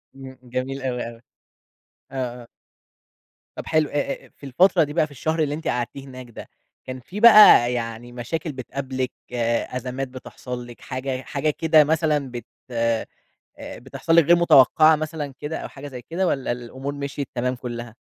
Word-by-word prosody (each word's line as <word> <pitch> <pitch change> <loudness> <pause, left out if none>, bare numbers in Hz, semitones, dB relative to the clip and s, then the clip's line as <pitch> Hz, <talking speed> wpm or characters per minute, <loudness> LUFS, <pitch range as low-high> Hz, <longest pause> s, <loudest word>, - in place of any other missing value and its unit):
إمم، 135 -1 -11
جميل 130 +2 -4
أوي، 125 -2 -3
أوي. 115 -1 -14 0.9
آه، 125 -2 -4
آه. - - -15 1.1
طَب - - -7
حلو، 155 -1 +2
أ 145 -1 -3
أ - - -20
في - - -13
الفترة 175 +6 +4
دي 145 -1 -5
بقى 155 -1 +2
في 150 - -16
الشهر 160 +4 -2
اللي 150 -2 +1
أنتِ 160 - -6
قعدتيه 125 +3 -3
هناك 130 -2 -10
ده، 115 - -11 0.4
كان 130 0 -6
في 185 +11 -8
بقى 210 - +8
يعني 115 0 -5
مشاكل 150 +8 -4
بتقابلِك، 130 0 -4 0.6
أزمات 130 +1 -4
بتحصل 125 -1 -8
لِك، 120 - -13
حاجة 130 0 -4
حاجة 145 +3 -2
كده 155 0 +4
مثلًا 150 -3 0
بت 120 -2 -7 0.3
آآ 115 -1 0 0.6
بتحصل 135 +6 -3
لِك 170 - +7
غير 170 +3 +6
متوقّعة 155 -1 +6
مثلًا 155 -2 -5
كده 150 +2 -4
أو - - -6
حاجة 145 +1 -10
زي 125 -3 -9
كده 180 +7 -2
والّا 135 -7 -1
الأمور 130 +4 -6
مِشْيت 140 -1 -5
تمام 125 +1 -1
كُلّها؟ 120 -2 -7
135 Hz, 170 wpm, -23 LUFS, 125-155 Hz, 1.1 s, بقى